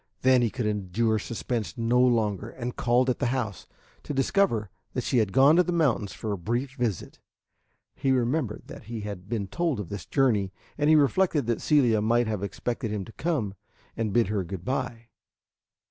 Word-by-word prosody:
Then 130 Hz, -1 st, +5 dB
he 120 Hz, -, +2 dB
could 125 Hz, 0 st, -3 dB
endure 105 Hz, +2 st, 0 dB
suspense 115 Hz, +2 st, -4 dB
no 115 Hz, +1 st, +2 dB
longer 110 Hz, -4 st, +1 dB
and 125 Hz, 0 st, -5 dB
called 125 Hz, +2 st, +2 dB
at 125 Hz, -, 0 dB
the -, -, +1 dB
house, 120 Hz, -6 st, -3 dB, 0.3 s
to 145 Hz, -, -5 dB
discover 135 Hz, -, +1 dB, 0.2 s
that 125 Hz, -, -2 dB
she 125 Hz, -, +2 dB
had 105 Hz, -3 st, +1 dB
gone 140 Hz, -, +6 dB
to -, -, +7 dB
the 180 Hz, -, -1 dB
mountains 135 Hz, -, +1 dB
for 110 Hz, -, -5 dB
a 100 Hz, -, -3 dB
brief 120 Hz, +8 st, -2 dB
visit. 120 Hz, -8 st, -3 dB, 0.7 s
He 135 Hz, -, 0 dB
remembered 125 Hz, -2 st, 0 dB
that -, -, -11 dB
he 115 Hz, 0 st, -5 dB
had 100 Hz, -2 st, -7 dB
been 110 Hz, -4 st, -1 dB
told 155 Hz, -, -1 dB
of 100 Hz, -, -5 dB
this 100 Hz, -1 st, -6 dB
journey, 110 Hz, -9 st, +2 dB, 0.2 s
and 145 Hz, +1 st, +1 dB
he 155 Hz, -, +7 dB
reflected 150 Hz, 0 st, +3 dB
that 115 Hz, 0 st, -1 dB
Celia 125 Hz, -8 st, +3 dB
might 120 Hz, +3 st, +2 dB
have 105 Hz, -3 st, -2 dB
expected 115 Hz, +3 st, -3 dB
him 105 Hz, -2 st, -3 dB
to -, -, -11 dB
come 135 Hz, -, -2 dB, 0.4 s
and 110 Hz, -2 st, -1 dB
bid 115 Hz, -1 st, +2 dB
her 105 Hz, -3 st, 0 dB
good 90 Hz, 0 st, -7 dB
by. 120 Hz, -2 st, -3 dB
115 Hz, 190 wpm, -27 LUFS, 105-130 Hz, 0.7 s, to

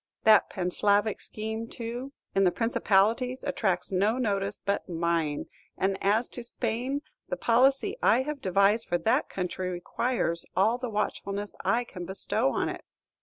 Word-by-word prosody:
That 220 Hz, -1 st, +6 dB
Panslavic 200 Hz, +3 st, +1 dB
scheme, 220 Hz, +1 st, -5 dB
too, 240 Hz, +4 st, -6 dB, 0.2 s
in 195 Hz, -, +3 dB
the 180 Hz, -, +4 dB
Principalities 230 Hz, +3 st, +1 dB
attracts 195 Hz, -11 st, -1 dB
no 205 Hz, +5 st, +2 dB
notice 200 Hz, -4 st, -1 dB
but 200 Hz, -1 st, -2 dB
mine; 165 Hz, -3 st, 0 dB, 0.3 s
and 190 Hz, +1 st, +1 dB
as 215 Hz, +5 st, +3 dB
to 245 Hz, -, -7 dB
Spain, 245 Hz, +4 st, -2 dB, 0.3 s
the -, -, -2 dB
policy 270 Hz, -, +3 dB
I 245 Hz, +4 st, +4 dB
have 295 Hz, 0 st, -5 dB
devised 200 Hz, +4 st, +3 dB
for 175 Hz, -, +1 dB
that 175 Hz, +7 st, +1 dB
country 185 Hz, 0 st, -3 dB
requires 175 Hz, 0 st, -1 dB
all 215 Hz, +7 st, +3 dB
the 250 Hz, -1 st, -3 dB
watchfulness 205 Hz, -1 st, -3 dB
I 240 Hz, +1 st, +2 dB
can 180 Hz, -7 st, -8 dB
bestow 190 Hz, +1 st, +1 dB
on -, -, 0 dB
it. -, -, -5 dB
215 Hz, 150 wpm, -28 LUFS, 190-240 Hz, 0.3 s, That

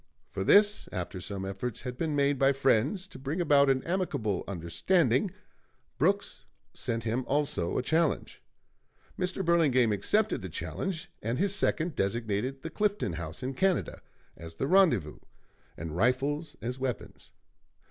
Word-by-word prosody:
For 95 Hz, -, -3 dB
this, 205 Hz, -, +4 dB
after 90 Hz, 0 st, -4 dB
some 95 Hz, +2 st, -5 dB
efforts 100 Hz, +4 st, -4 dB
had 125 Hz, -1 st, -5 dB
been 155 Hz, +2 st, -2 dB
made 140 Hz, -1 st, +2 dB
by 135 Hz, 0 st, +4 dB
friends 135 Hz, -, +1 dB
to 160 Hz, -, -12 dB
bring 140 Hz, +6 st, -3 dB
about 145 Hz, -4 st, +4 dB
an 130 Hz, -1 st, +2 dB
amicable 155 Hz, -, -1 dB
understanding, 115 Hz, -, +1 dB, 0.7 s
Brooks -, -, +1 dB, 0.3 s
sent 115 Hz, -1 st, -3 dB
him 115 Hz, +3 st, -1 dB
also 140 Hz, -, 0 dB
a -, -, 0 dB
challenge. 160 Hz, +2 st, 0 dB, 0.7 s
Mr. 185 Hz, +1 st, -2 dB
Burlingame 140 Hz, -9 st, +4 dB
accepted 205 Hz, -, +1 dB
the -, -, -6 dB
challenge, 175 Hz, -2 st, -4 dB
and 115 Hz, +3 st, -2 dB
his 195 Hz, +2 st, +2 dB
second 170 Hz, -4 st, +1 dB
designated 115 Hz, +4 st, -2 dB
the 165 Hz, -, -5 dB
Clifton 205 Hz, -, 0 dB
House 80 Hz, +1 st, -6 dB
in 130 Hz, +1 st, -2 dB
Canada 190 Hz, +5 st, 0 dB, 0.3 s
as 80 Hz, +1 st, -10 dB
the 135 Hz, -, -2 dB
rendezvous 145 Hz, -, +3 dB, 0.6 s
and 80 Hz, 0 st, -6 dB
rifles 140 Hz, -, 0 dB
as 125 Hz, +2 st, -3 dB
weapons. 130 Hz, -3 st, -5 dB
135 Hz, 145 wpm, -29 LUFS, 105-170 Hz, 0.7 s, this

